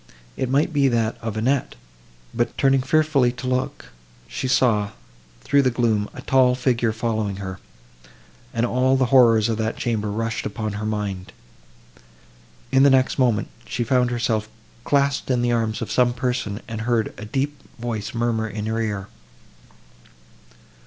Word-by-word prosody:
—It 130 - -2
might 145 +5 +1
be 140 -2 +3
that 115 -3 +1
of 110 -2 -4
Annette; 130 +4 0 0.6
but, 120 +1 -1
turning 135 -1 +3
fearfully 140 -2 +2
to 125 +1 -8
look, 130 0 -2 0.4
she 130 - -4
saw, 110 -6 +2 0.5
through 140 - +3
the 130 - +3
gloom, 115 -4 0
a - - -8
tall 130 -1 +4
figure 125 -3 +1
following 110 -2 -2
her, 95 -1 -6 0.9
and 115 0 0
all 130 +2 +2
the 130 - +3
horrors 115 -4 +6
of 115 -1 -2
that 110 0 -1
chamber 110 -3 -1
rushed 115 +1 -2
upon 110 0 -4
her 105 +1 -4
mind. 100 -4 -4 1.4
In 135 - +4
the 140 - +7
next 130 +1 +2
moment, 120 -5 +2 0.2
she 120 - -2
found 125 +1 +2
herself 115 -3 -1 0.4
clasped 140 -1 +1
in 125 -2 +1
the 120 - +1
arms 115 -2 0
of - - -6
some 125 -1 +3
person, 125 -4 -2
and 115 -2 -5
heard 115 -2 0
a 105 - -9
deep 140 +4 -2 0.2
voice 115 -3 -4
murmur 115 -1 0
in 105 0 -5
her 110 +1 -1
ear. 100 -3 -3
120 Hz, 160 wpm, -22 LUFS, 110-130 Hz, 1.4 s, the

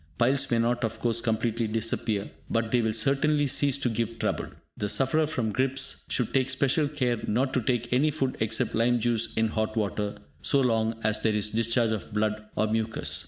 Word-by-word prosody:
Piles 130 +3 +3
may 120 - +2
not, 120 +1 +1
of 115 - -2
course, 115 -1 +1
completely 115 0 0
disappear, 110 -1 -1 0.2
but 115 -1 0
they 125 - +3
will 110 -1 +1
certainly 140 +6 +2
cease 140 0 +2
to 135 - -1
give 115 0 -2
trouble. - - -2 0.3
The 105 - -3
sufferer 150 +7 +2
from 120 -8 -2
gripes 130 +4 0
should 125 - -1
take 130 -1 +2
special 140 +3 +2
care 130 -6 -1
not 130 +5 0
to 130 - +1
take 120 0 -1
any 140 +5 +3
food 135 -4 -1
except 110 0 0
lime 120 +1 +2
juice 115 -1 0
in 110 0 +2
hot 110 0 -2
water, 105 -1 -2 0.2
so 140 - +2
long 115 -3 +1
as 110 0 +2
there 110 - +1
is 105 0 -1
discharge 115 +1 +1
of 110 -1 -4
blood 110 0 0
or 110 - +2
mucus. 110 0 -1
115 Hz, 200 wpm, -27 LUFS, 110-130 Hz, 0.3 s, Piles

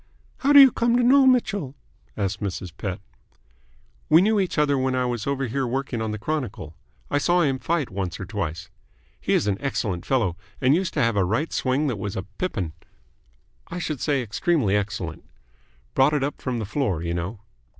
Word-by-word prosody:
"How 275 - +1
do 285 - +10
you 270 -2 +9
come 235 +1 +1
to 245 - +2
know 265 +2 +6
Mitchell?" 205 - +1 0.4
asked 100 -1 -2
Mrs. 95 -3 -4
Pett. 95 -1 -4 1.1
"We 160 - +7
knew 215 0 +3
each 185 -4 -1
other 150 -1 +3
when 130 -1 0
I 125 0 +1
was 120 -1 -3
over 140 -1 0
here 130 +2 -1
working 130 -2 -2
on 110 - -2
the 105 - -3
Chronicle. 115 - -4 0.4
I 145 - +2
saw 175 +4 +3
him 135 -5 +1
fight 160 -7 -1
once 95 -3 -4
or 100 - -5
twice. 90 -5 -4 0.5
He - - -1
is - - +2
an 100 -2 0
excellent 105 -10 -2
fellow, 110 -10 +1 0.2
and 130 +2 +4
used 180 +2 0
to 145 - +2
have 115 -1 +1
a 100 - +3
right 110 - -1
swing 130 +3 +1
that 125 -8 -2
was 100 0 -4
a 95 - -3
pippin 100 - -4 0.9
I 175 - -6
should 160 -6 -3
say 140 -4 +1
extremely 115 - +1
excellent. 100 -5 -3 0.7
Brought 135 +3 +4
it 145 - 0
up 145 - -3
from 130 -2 -2
the 110 - -3
floor, 100 - -1
you 85 0 -2
know." 90 +5 -4
130 Hz, 200 wpm, -24 LUFS, 100-150 Hz, 1.1 s, do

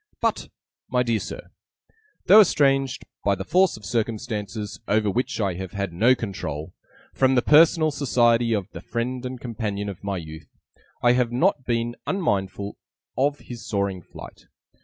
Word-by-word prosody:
'But, - - -1 0.4
my 125 -1 +2
dear 115 -2 0
Sir, - - -8 0.7
though 205 +4 +9
estranged 135 -7 +2 0.2
(by 100 -1 +2
the 95 - -5
force 185 - +3
of 105 - -12
circumstances 110 -2 -3
over 105 0 +2
which 125 +3 -2
I 100 -4 0
have 95 0 -7
had 100 -3 -3
no 115 +9 +4
control) 80 - -5 0.4
from 130 0 +3
the 125 - +3
personal 155 +1 +5
society 120 -4 +2
of 100 -4 0
the - - -9
friend 125 +2 -3
and 125 0 -7
companion 105 -4 -4
of 100 - -9
my 100 -1 -2
youth, 80 -2 -9 0.5
I 120 - +6
have 125 -1 +2
not 130 +1 +1
been 120 0 -1
unmindful 100 - -1 0.4
of 145 +2 +1
his 120 -2 -9
soaring 100 -3 -1
flight. - - -13
115 Hz, 160 wpm, -24 LUFS, 100-130 Hz, 0.7 s, though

